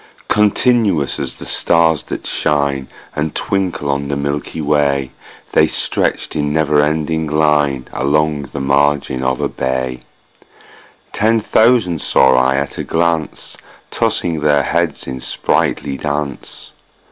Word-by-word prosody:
Continuous 105 - +2
as - - -4
the - - -8
stars 80 -3 +2
that - - -7
shine 70 -2 0 0.3
And 75 0 -2
twinkle 90 -7 -1
on 70 0 -2
the 70 - -2
milky 70 +3 -3
way, 70 -3 +1 0.4
The - - +5
stretched - - -1
in 75 -1 -1
never 75 -1 +2
ending 80 +1 -1
line 75 -3 +1
Along 75 +1 0
the 70 - -5
margin 70 -1 +1
of 65 0 0
a - - 0
bay: 65 -1 -3 1.1
Ten 110 +2 +2
thousand 110 -7 +2
saw 65 -1 +4
I 65 +1 +3
at 70 +1 -3
a - - -2
glance, 80 -2 -2 0.4
Tossing 85 -3 0
their 75 -1 +2
heads 85 +1 -1
in 65 -1 -6
sprightly 70 +2 -1
dance. 75 -1 -5
75 Hz, 130 wpm, -17 LUFS, 70-80 Hz, 1.1 s, The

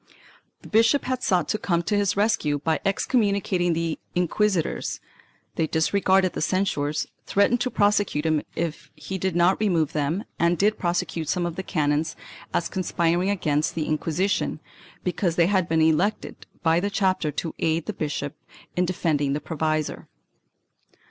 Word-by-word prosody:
The - - -11
bishop 230 +6 +3
had 255 -1 -2
sought 180 -7 +1
to 215 - 0
come 170 -4 0
to 205 - 0
his 200 -1 +1
rescue 200 -9 +2
by 160 +2 0
excommunicating 200 -4 +1
the 165 -1 -2 0.2
inquisitors; 180 0 0 0.6
they 160 - +1
disregarded 185 +3 +2
the - - -4
censures, 155 -4 0 0.2
threatened 230 +5 +3
to 255 - +1
prosecute 205 -8 +1
him 155 -2 +2
if 165 -1 -3
he 160 +5 -6
did 190 -1 -1
not 175 +2 +3
remove 175 -8 +1
them 155 +7 -1 0.2
and 170 +1 +3
did 210 +4 +2
prosecute 170 -3 -1
some 180 -2 0
of 170 -1 -3
the - - -3
canons 150 -3 0 0.4
as 170 - 0
conspiring 175 0 0
against 155 -7 0
the 160 -2 -1
Inqui 155 +2 -2
sition, 200 - 0 0.5
because 180 -1 0
they 170 - +4
had 185 -2 +1
been 160 0 +2
elected 175 +7 0 0.2
by 165 0 +4
the 200 +3 -1
chapter 190 -5 +1
to 165 +3 -3
aid 160 0 0
the - - -3
bishop 145 -1 -3 0.4
in 180 - +2
defending 150 -6 0
the 145 - -1
provisor. 155 -1 -2
175 Hz, 160 wpm, -25 LUFS, 160-195 Hz, 0.6 s, they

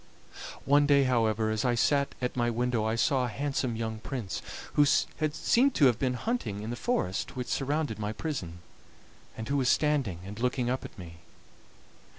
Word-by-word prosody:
One 145 +1 +4
day, 140 -1 +5
however, 110 -4 +1
as 110 0 -1
I 125 -2 +2
sat 140 +4 +2
at 125 - -1
my 120 -1 +1
window 120 -1 0
I 110 +1 0
saw 130 +2 +2
a - - -3
handsome 135 -1 -2
young 110 -1 -3
prince, 120 -5 -4 0.3
who 145 - +5
seemed 155 - +2
to 150 - +5
have 120 -4 +4
been 130 -2 0
hunting 120 - -3
in 110 - -4
the - - -3
forest 120 - -2
which 125 -1 -3
surrounded 145 -4 -1
my 105 0 -2
prison, 95 - -5 0.8
and 110 0 -5
who 140 - 0
was 130 -2 +2
standing 140 - +1
and 100 +2 -8
looking 125 0 0
up 130 - -2
at - - -10
me. 85 -3 -10
125 Hz, 180 wpm, -29 LUFS, 110-140 Hz, 0.8 s, day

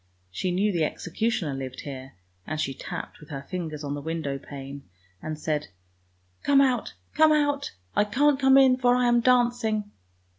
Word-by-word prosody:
She 180 - -2
knew 195 +4 +1
the 170 -4 0
executioner 180 - -1
lived 130 -1 -6
here, 135 -2 -8 0.3
and 155 0 -3
she 135 -3 -1
tapped - - -7
with 150 - -15
her 140 -2 -6
fingers 155 -2 -5
on 145 -1 -3
the 145 - -4
window 150 -3 -3
pane 140 0 -8 0.4
and 155 0 -5
said, 150 -1 -2 0.3
— 90 0 -41
" 90 0 -40
Come 280 -1 +5
out! 255 -4 +1 0.2
come 315 0 +5
out! 290 - +1 0.2
I - - +4
can't 275 +6 +2
come 265 0 +6
in 260 -2 +6
for 245 -1 +3
I 250 0 +2
am 240 0 +4
dancing! 240 -4 +2
175 Hz, 185 wpm, -26 LUFS, -, 0.4 s, come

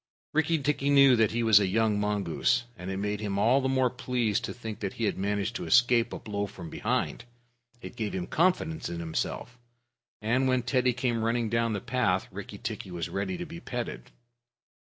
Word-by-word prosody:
Rikki 160 +1 +2
tikki 145 -1 0
knew 140 -2 +7
he 115 +2 -2
was 110 -3 +7
a 100 - +1
young 110 +1 +2
mongoose, 105 -2 +1
and 90 -2 -7
it 95 - -3
made 105 +1 -2
him 100 -2 -2
all 120 +7 +4
the 130 - 0
more 130 -2 +2
pleased 125 -4 -1
to - - -5
think 110 -3 -7
that 100 -3 -3
he 115 - -5
had 105 - +1
managed 100 +3 -1
to - - -6
escape 120 -1 +4
a - - -4
blow 100 -1 -3
from 85 -4 -10
behind. - - -2 0.6
It - - -8
gave 110 -3 -3
him 90 -2 -2
confidence 165 -2 0
in 85 -1 -5
himself, 85 +9 -4 0.6
and 125 +5 +1
when 130 -1 +2
Teddy 125 0 +2
came 120 -2 -1
running 115 0 0
down 115 0 +1
the 100 - -3
path, 115 -7 0
Rikki - - -8
tikki - - -5
was 85 -2 -4
ready 100 - -2
to 175 - -5
be 170 +1 -9
petted. 120 -7 -5
115 Hz, 200 wpm, -28 LUFS, 100-130 Hz, 0.6 s, knew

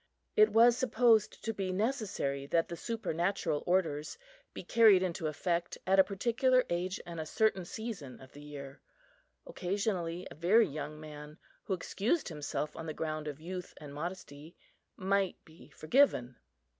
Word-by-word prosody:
It 430 0 +6
was 235 +1 +6
supposed 240 -3 +3
to 225 - -1
be 195 -3 -2
necessary 195 - -1
that 165 +2 +1
the 170 - -4
supernatural 185 -6 -1
orders 165 -5 0 0.3
be - - -8
carried 215 -5 +6
into 170 -3 -2
effect 170 +3 -2
at 195 +1 +4
a - - +9
particular 240 +6 +2
age 180 +2 -1
and 170 -1 -7
a 160 - -3
certain 215 -3 +1
season 195 - -6
of 130 0 -14
the 145 - -12
year. 140 -2 -9 0.6
Occasionally 180 -2 -2
a - - -7
very 195 +8 +4
young 150 0 -6
man, 150 0 -10 0.3
who 190 - 0
excused 220 - -1
himself 150 -1 -4
on 165 - -7
the 155 - -4
ground 155 -1 -3
of 150 -1 -5
youth 180 +2 -7
and 145 -2 -10
modesty, 155 -1 -7 0.4
might 195 0 +1
be 160 +1 -16
forgiven. 155 - +2
175 Hz, 155 wpm, -32 LUFS, 155-210 Hz, 0.6 s, a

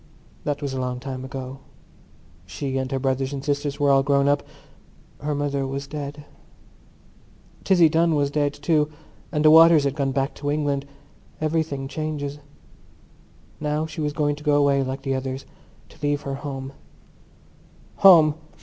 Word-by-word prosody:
That 145 0 -2
was 140 -2 -3
a 130 - -3
long 125 -1 -3
time 130 -1 -6
ago; 130 0 -7 0.9
she 135 - -3
and 130 0 -3
her 135 - 0
brothers 135 +1 -1
and 140 0 -5
sisters 145 0 -2
were 145 -1 +3
all 135 0 +5
grown 140 0 +2
up; 145 0 +3 0.8
her 150 0 -2
mother 140 -1 -1
was 140 +1 -4
dead. 145 0 -7 1.4
Tizzie 175 -4 +5
Dunn 165 +1 +2
was 140 -1 +1
dead, 145 -1 +1
too, 150 +1 +1 0.4
and 150 0 0
the 155 - +8
Waters 165 -1 +8
had 140 -1 0
gone 140 -2 -1
back 135 +1 -1
to 145 - -4
England. 145 -2 -1 0.5
Everything 155 -3 -1
changes. 145 -1 -4 1.2
Now 150 +1 -1
she 160 0 -6
was 150 -1 0
going 145 -1 0
to 150 - -12
go 150 -1 +3
away 140 -1 +3
like 135 +1 -4
the 135 -1 -1
others, 130 0 -4 0.4
to - - -19
leave 145 0 0
her 140 - -4
home. 135 -1 -6 1.2
Home! 165 -6 +7
145 Hz, 160 wpm, -23 LUFS, 135-150 Hz, 1.4 s, the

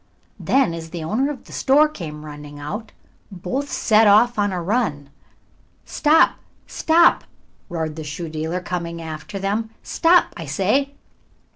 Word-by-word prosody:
Then, 265 -10 +2
as 165 -1 -7
the 165 0 -6
owner 225 - 0
of 290 -3 -7
the - - -16
shoe - - -5
store 290 +3 +5
came 155 - -8
running 145 -1 -10
out, 210 +10 -6 0.4
both 200 +10 -4
set 220 0 +4
off 220 +3 +5
on 205 -1 +1
a 180 - -2
run. 170 - -1 0.7
"Stop! 315 +2 +3 0.3
stop!" 335 +1 +3 0.5
roared 160 -3 -3
the 160 - -6
shoe 150 +3 -6
dealer, 160 +3 -3
coming 170 -2 -4
after 155 +2 -7
them. 205 +3 -2
"Stop, 345 +1 +3
I 165 - -7
say!" 265 - 0
185 Hz, 150 wpm, -21 LUFS, 160-245 Hz, 0.7 s, store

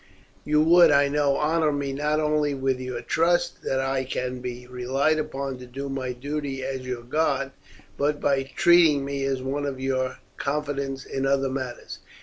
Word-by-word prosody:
You 150 +1 +3
would, 170 +2 +7
I 140 0 +4
know 145 -1 +2
honour 155 0 +2
me 140 -1 -2
not 150 +2 0
only 150 -2 +1
with 135 -1 0
your 125 -2 -5
trust 175 +5 +1
that 135 - -1
I 135 0 0
can 125 -1 -3
be 125 0 -6
relied 130 +5 0
upon 140 -3 -4
to 125 - -10
do 135 +3 -6
my 130 -2 -3
duty 135 +1 -4
as 130 -1 -4
your 125 -2 -4
guard, 135 0 0 0.5
but 145 +1 +1
by 140 -1 +2
treating 165 -5 +5
me 140 0 -3
as 135 -1 -1
one 145 +2 -2
in 135 -2 -4
your 130 -1 -1 0.2
confidence 140 -2 -2
in 135 0 -2
other 135 0 +2
matters. 130 -2 -5
135 Hz, 175 wpm, -25 LUFS, 130-150 Hz, 0.5 s, would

